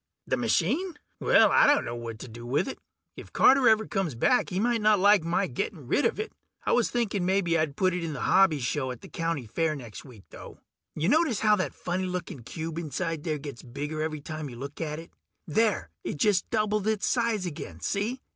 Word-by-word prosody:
The - - 0
machine? 245 - 0 0.2
Well, - - +5
I - - +6
dunno 285 - +2
what 115 -1 -6
to - - -7
do 120 +1 -10
with 125 - 0
it. 270 - -6 0.4
If - - -11
Carter 265 -2 +5
ever 220 0 +3
comes 195 - -2
back 250 - +2
he 185 -1 -2
might 235 +1 +1
not 215 0 +5
like 205 -2 +5
my 170 +1 +1
getting - - -4
rid - - +1
of - - 0
it. 435 +1 -4 0.3
I - - +1
was 245 - +3
thinking 215 -6 -1
mebbe 190 -1 +1
I'd 155 -4 +1
put 185 +1 +2
it 180 -1 -2
in 160 -2 -3
the 135 - -6
hobby 190 -5 +4
show 130 +1 -1
at 125 -2 -7
the - - -11
county 165 -6 -3
fair 155 +8 -1
next 120 -7 -9
week, 120 -8 -14
though. - - -11 0.4
Ya 155 +2 0
notice 290 - +2
how 215 -1 +5
that 185 - -2
funny 185 +1 -2
looking 180 -6 -5
cube 160 +7 -5
inside 165 +1 -3
there 155 -2 -1
gets 140 -4 -8
bigger 145 +5 -5
every 155 -1 -3
time 155 -1 -6
you 120 - -9
look 140 +5 -7
at 150 -2 -3
it? 165 +1 -10 0.3
There... 170 - +1
it - - -4
just 195 +2 +2
doubled 215 -2 0
its 220 -2 +1
size 230 -5 +1
again, 120 - -7
see? 220 - -2
170 Hz, 220 wpm, -27 LUFS, 145-215 Hz, 0.4 s, I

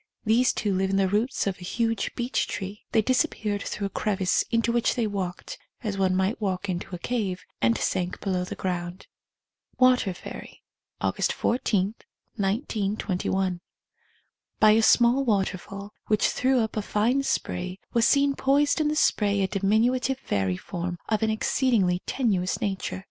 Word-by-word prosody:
These 230 +3 +4
two 205 -2 -1
live 190 +1 +1
in 195 - 0
the 195 -1 +3
roots 215 +7 0
of 195 -2 -2
a - - -10
huge 225 +4 -1
beech 245 +1 -1
tree 195 +2 -5
— - - -54
they 220 - +3
disappeared 220 -5 0
through 200 - -4
a - - -2
crevice 190 -3 +1
into 230 0 +1
which 235 0 +1
they 235 -3 0
walked 190 -4 -4 0.2
(as 210 -3 -2
one 190 -1 +1
might 190 +5 0
walk 190 -1 -2
into 185 0 -4
a - - -5
cave) 190 -3 -2 0.2
and 115 -1 +3
sank 180 - -1
below 185 -2 -1
the 180 - -6
ground. 180 0 -4 0.7
Water 255 -6 +4
Fairy. - - -10 0.4
(August - - 0
14, 210 -5 0 0.4
1921.) 195 -4 -1 1.0
By 215 -1 +7
a 220 +1 +5
small 240 +4 +5
waterfall, 200 -2 -2
which 215 -1 +3
threw 260 -1 +2
up 220 0 -2
a 215 - 0
fine 225 +6 +1
spray, 185 -8 -2 0.2
was 235 -1 +4
seen 280 0 +3
poised 285 +3 +2
in 305 - +2
the 300 - 0
spray 205 -8 +2
a - - +1
diminutive 225 +7 +1
fairy 95 - -1
form 175 - -5
of 215 -1 +1
an 220 - +2
exceedingly 215 -4 +1
tenuous 195 -8 0
nature. 195 -1 -3
205 Hz, 165 wpm, -26 LUFS, 190-235 Hz, 1.0 s, By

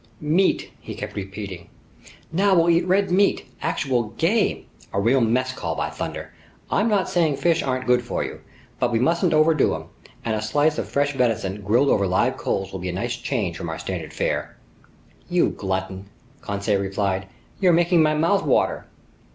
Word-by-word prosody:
"Meat!" 165 +6 +1
he - - -8
kept - - -6
repeating. 95 -3 -7 0.6
"Now 195 +3 +3
we'll 170 0 +4
eat 170 +1 +2
red 190 +1 +2
meat! 200 +2 +3 0.2
Actual 130 -4 0
game! 205 +6 +1 0.3
A 100 - -1
real 120 +6 +3
mess 130 +3 +1
call, - - -3
by - - -2
thunder! - - -6 0.4
I'm 215 +3 +2
not 205 -3 +2
saying 165 -6 +2
fish 170 +1 +2
aren't 130 -1 -2
good 125 0 +3
for 120 - -3
you, - - -7 0.4
but 120 - +1
we 115 - +2
mustn't 170 +8 +2
overdo 155 -1 +3
'em, - - -9 0.4
and 115 - 0
a 105 - -2
slice 145 +9 +1
of - - -4
fresh 145 0 +1
venison 110 -6 0
grilled 120 +8 +3
over 100 -2 +3
live 95 +1 +1
coals 95 0 -2
will 95 - -5
be 90 +1 -4
a - - -3
nice 120 +6 -2
change 120 -8 -2
from 85 - -5
our 80 - -4
standard - - -5
fare." - - -2 0.7
"You 175 0 +3
glutton," 95 0 -4 0.3
Conseil 100 0 -1
replied, 95 -1 -1 0.3
"you're 185 -3 +4
making 170 0 +4
my 155 -1 +3
mouth 170 +6 +2
water!" - - +1
130 Hz, 180 wpm, -23 LUFS, 100-165 Hz, 0.7 s, we'll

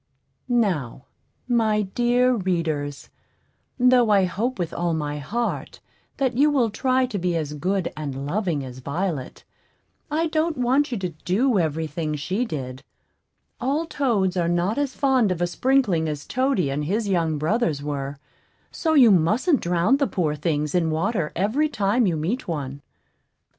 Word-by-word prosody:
Now, 180 - 0 0.4
my 220 -3 +2
dear 245 +5 +2
readers, 165 - -2 0.7
though 250 -2 +4
I 200 -2 +5
hope 220 +8 -1
with 175 -2 -3
all 170 -1 -1
my 150 -1 -3
heart 230 - -3 0.4
that 260 -3 0
you 290 +4 +4
will 255 -7 +2
try 255 +3 +1
to 225 -6 -4
be 175 -1 0
as 150 -3 -2
good 185 +5 -1
and 140 -3 -5
loving 165 -4 -1
as 130 0 -9
Violet, 145 0 -4 0.7
I 315 +3 0
don't 315 0 0
want 260 +3 +2
you 240 - -1
to 185 -2 -3
do 195 - 0
every 160 -1 0
thing 155 0 -3
she 185 - -2
did. 130 - -5 0.8
All 280 +6 0
toads 225 - 0
are 175 -2 +1
not 175 +8 0
as 280 -2 -2
fond 260 -7 +2
of 180 - -2
a 175 - +2
sprinkling 190 -5 +1
as 145 -1 -5
Toady 255 - 0
and 145 +2 -2
his 210 +6 -1
young 165 -5 +1
brothers 155 - 0
were; 140 -1 -4 0.5
so 320 -1 0
you 250 -6 +7
mustn't 215 - +3
drown 175 +9 +2
the 280 -1 +1
poor 165 -9 -1
things 150 -1 -1
in 170 -2 +2
water 160 +1 -1
every 235 - +1
time 215 -1 +1
you 170 -3 0
meet 185 +12 -2
one. 140 -4 -4
185 Hz, 160 wpm, -23 LUFS, 155-245 Hz, 0.8 s, you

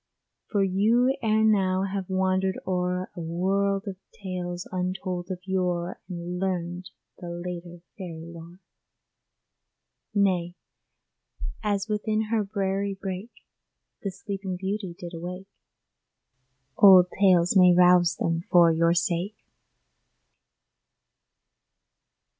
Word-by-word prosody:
For 205 -3 +1
you 220 +7 +3
ere 220 -1 +2
now 190 -3 +2
have 195 -1 -3
wandered 190 0 +1
o'er 180 0 -1
A - - -7
world 195 +4 0
of 190 -2 -5
tales 180 -2 -5
untold 185 0 -3
of 185 -1 -5
yore, 180 -2 -1
And 175 0 -5
learned 180 -1 -3 0.3
the 175 - -7
later 175 0 -7 0.2
fairy 165 -3 -7
lore! 170 +2 -12 1.6
Nay, 180 -3 +1 1.1
as 205 -2 -1
within 215 0 -1
her 225 -2 +2
briery 195 0 -2
brake, 195 +4 -7 0.6
The 200 - -2
Sleeping 195 -1 -5
Beauty 190 -1 -4
did 175 0 -8
awake, 180 +4 -7 1.2
Old 190 -3 +8
tales 180 -2 +4
may 180 -1 +7
rouse 180 -1 +5
them 165 0 -1
for 170 -2 +6
your 165 +1 +2
sake. 175 +3 -1
185 Hz, 105 wpm, -26 LUFS, 175-195 Hz, 1.6 s, Old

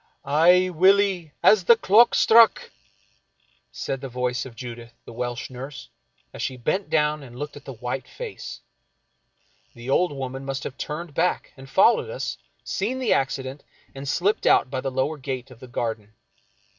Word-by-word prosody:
Aye, 175 +6 +4
Willie, 185 -1 +3
as 200 -4 +5
the 235 - +7
clock 225 +2 +5
struck! 230 0 +5 0.5
" - - -43 0.3
said 135 -1 -4
the 135 - -6
voice 125 +1 -2
of 120 - -14
Judith, 120 -1 -9
the - - -10
Welsh 120 +2 -4
nurse, 135 +3 -8 0.4
as - - -7
she 130 - -3
bent 155 +11 -1
down 150 -1 +1
and 125 -3 -12
looked 145 +2 -6
at 145 - -12
the 135 - -7
white 125 +2 -5
face. 480 -3 -8 1.1
The 120 +2 -6
old 180 +4 +3
woman 135 -1 -5
must 135 0 -4
have 130 - -6
turned 155 +2 -6
back - - -1
and 135 0 -13
followed 225 - +4
us, - - -4 0.2
seen 225 +7 -2
the 260 - +2
accident, 135 +1 -2 0.3
and 135 +1 -8
slipped 185 +9 +1
out 130 - +4
by 130 - -2
the 135 - -2
lower 135 +4 -2
gate 130 -1 -5
of 120 - -14
the 130 - -11
garden. 110 -3 -4
135 Hz, 170 wpm, -24 LUFS, 125-180 Hz, 1.1 s, the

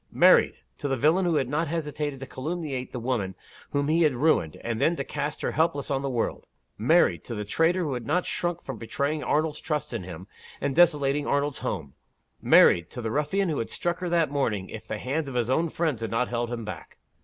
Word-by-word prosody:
Married - - +5 0.2
to - - -2
the 135 -1 0
villain 160 +8 +3
who 170 -2 +2
had 135 -4 +1
not 150 +5 0
hesitated 150 -3 -3
to 135 - -6
calumniate 140 -2 -4
the 125 - -4
woman 115 -6 -2 0.3
whom 140 0 0
he 160 +3 +3
had 150 -5 +3
ruined, 120 - +2
and 115 0 -2
then 165 +5 +3
to 140 - -3
cast 145 +2 -4
her - - 0
helpless 160 -3 0
on 135 -1 0
the 140 - -2
world. 120 -3 -2 0.3
Married 115 - +3
to 115 - -6
the 105 0 -4
traitor 165 - +2
who 145 -4 -2
had 120 -2 -5
not 180 - +1
shrunk 175 -1 -2
from 130 -5 -6
betraying 140 +6 -2
Arnold's 155 0 0
trust 150 -3 -2
in 115 - -2
him, 90 0 -8 0.3
and 140 -1 -1
desolating 150 -4 +3
Arnold's 140 0 0
home. 85 - -4 0.5
Married 85 0 +6
to - - -8
the 110 - -2
ruffian 175 - 0
who 155 - -1
would 115 - -2
have - - -4
struck 175 0 -1
her 180 -1 -3
that 170 -4 +2
morning, 110 -9 -1
if 110 0 -8
the 110 - -3
hands 140 +6 -2
of 130 - -7
his 120 0 0
own 165 +5 +2
friends 155 -8 -1
had 115 - -2
not 115 +2 0
held 120 0 -2
him 115 -2 -4
back. 105 - -8
140 Hz, 230 wpm, -26 LUFS, 120-160 Hz, 0.5 s, Married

